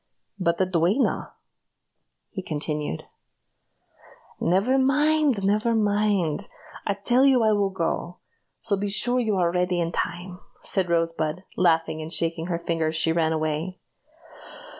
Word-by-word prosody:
"But 170 -2 +1
the 190 - +2
duenna?" 185 - 0 1.0
he 190 - -5
continued. 150 - -3 1.4
"Never 200 +10 +2
mind! 280 -3 +2
never 215 +4 +2
mind! 205 -5 +1 0.4
I 200 - +1
tell 240 +6 +2
you 265 -4 +5
I 220 - +4
will 205 -2 +2
go! 175 -1 -3 0.4
so 220 -3 0
be 200 +1 -2
sure 245 +5 +1
you 220 -4 0
are 175 -2 +2
ready 180 0 0
in 165 -1 -1
time," 175 +1 -4 0.2
said 185 -3 +2
Rosebud, 165 0 -1
laughing, 165 -3 +2
and 155 +1 -7
shaking 165 0 -1
her 175 -2 -1
finger 165 -1 -1
as 155 - -2
she 160 +1 +2
ran 160 -1 +1
away. 155 +3 -2
180 Hz, 140 wpm, -25 LUFS, 165-210 Hz, 1.4 s, you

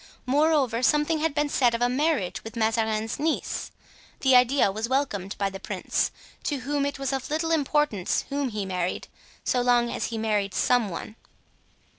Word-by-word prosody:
Moreover, 275 -3 +2
something 300 +4 +2
had 310 -2 0
been 295 0 +2
said 245 -4 +2
of 230 - -4
a - - +4
marriage 260 - 0
with 225 +2 -9
Mazarin's 220 0 0
niece. 315 +2 -1 0.5
The 265 -2 +5
idea 250 -3 +5
was 220 +4 -3
welcomed 210 -8 -1
by 200 -1 -1
the 195 - -7
prince, - - -1 0.4
to 285 -4 -1
whom 280 +2 0
it 285 - -4
was 275 0 -2
of 265 -1 -3
little 320 +2 -1
importance 295 - +1
whom 280 -1 -1
he 210 -3 -3
married, 180 -1 -3 0.3
so 250 - +1
long 240 -1 +3
as - - -2
he 230 - -4
married 210 -3 0
some 245 -4 +2
one. 200 +5 -7
250 Hz, 175 wpm, -26 LUFS, 220-285 Hz, 0.5 s, The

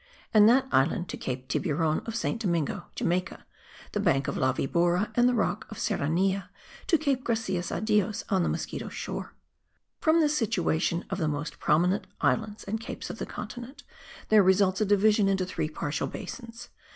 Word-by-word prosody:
and 215 0 +7
that 265 +2 +4
island 160 +6 +2
to - - -5
Cape 130 0 -5
Tiburon 155 +2 0
of 225 - -4
St. 230 0 -2
Domingo; 170 -7 -1
Jamaica, 180 +3 -2 0.5
the 210 - -2
Bank 155 -9 +2
of - - -2
La 130 - +2
Vibora 175 +9 +1
and 245 +2 +4
the 250 - +1
rock 210 -1 -1
of 215 - -8
Serranilla 190 +1 0 0.4
to 330 - +4
Cape 280 -4 0
Gracias 205 -7 -1
a - - -2
Dios 210 -1 +1
on 190 -3 +2
the - - +1
Mosquito - - -4
Shore. - - -6 0.6
From 320 +1 +4
this 300 -2 +3
situation 175 - 0
of - - -2
the 160 - +1
most 150 +1 -4
prominent 175 +6 +2
islands 215 -1 0
and 220 +2 -3
capes - - -6
of - - -9
the - - -4
continent, 245 +6 -8 0.5
there 215 -1 +7
results 190 +1 +3
a - - +4
division 205 +1 +4
into 190 -1 +1
three 155 -4 -3
partial 150 -1 -3
basins. 230 -2 -8
195 Hz, 175 wpm, -28 LUFS, 170-225 Hz, 0.6 s, and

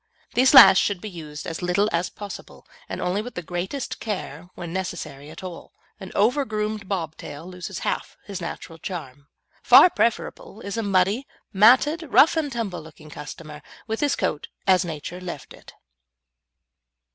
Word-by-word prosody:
These 260 +3 +4
last 195 -8 +11
should 200 -3 0
be 215 +2 -7
used 150 -4 -8
as 165 - -5
little 180 +4 +2
as 170 +1 0
possible, 205 -1 -10 0.2
and - - -4
only 185 +3 0
with 245 +3 -9
the 175 - -4
greatest 180 - -4
care 180 -6 -5
when 170 -1 -7
necessary 175 -6 -5
at 160 +4 -11
all. 180 -2 -9 0.3
An 190 - -9
over 250 +8 +3
groomed 215 -4 -3
bob 165 -5 -2
tail 145 +3 -9
loses 180 +1 -7
half - - -3
his 200 -3 -6
natural 165 -1 -7
charm. 145 -6 -7 0.3
Far 360 - +8
preferable 220 -2 -1
is 200 -2 -5
a 230 - -1
muddy, 200 +5 +1 0.3
matted, 255 - +5
rough 300 +6 +6
and 310 -3 -1
tumble 225 -8 -3
looking 155 -1 -14
customer, 150 +1 -9 0.2
with 220 0 -3
his 290 -2 +1
coat 150 - -2 0.2
as 190 -1 +4
Nature 170 +2 -6
left 170 -6 -7
it. - - -15
185 Hz, 165 wpm, -24 LUFS, 165-215 Hz, 0.3 s, last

